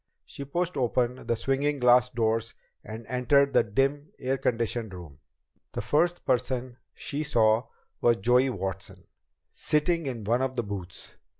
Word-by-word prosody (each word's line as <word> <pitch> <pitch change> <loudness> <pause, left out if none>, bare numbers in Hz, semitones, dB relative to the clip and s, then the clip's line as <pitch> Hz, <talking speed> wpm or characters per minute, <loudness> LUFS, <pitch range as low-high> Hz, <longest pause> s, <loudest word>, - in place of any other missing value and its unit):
She 140 - -7
pushed 175 +5 -2
open 125 0 0
the 115 - +2
swinging 135 +5 0
glass 125 -1 +5
doors 115 -1 -1 0.3
and 110 +1 -8
entered 140 +2 +3
the - - +6
dim, 135 +7 0
air 130 0 -1
conditioned 115 -3 -1
room. 80 -6 -11 0.5
The - - -2
first 165 +10 +1
person 125 -1 -1 0.2
she 145 +1 -4
saw 115 -5 +2 0.3
was 120 -1 +4
Joey 125 +5 +3
Watson, 95 -5 -5 0.5
sitting 160 +1 +1
in 120 -5 -4
one 120 +5 +1
of 130 0 -1
the 120 - -1
booths. 95 -4 -6
125 Hz, 145 wpm, -27 LUFS, 115-140 Hz, 0.5 s, the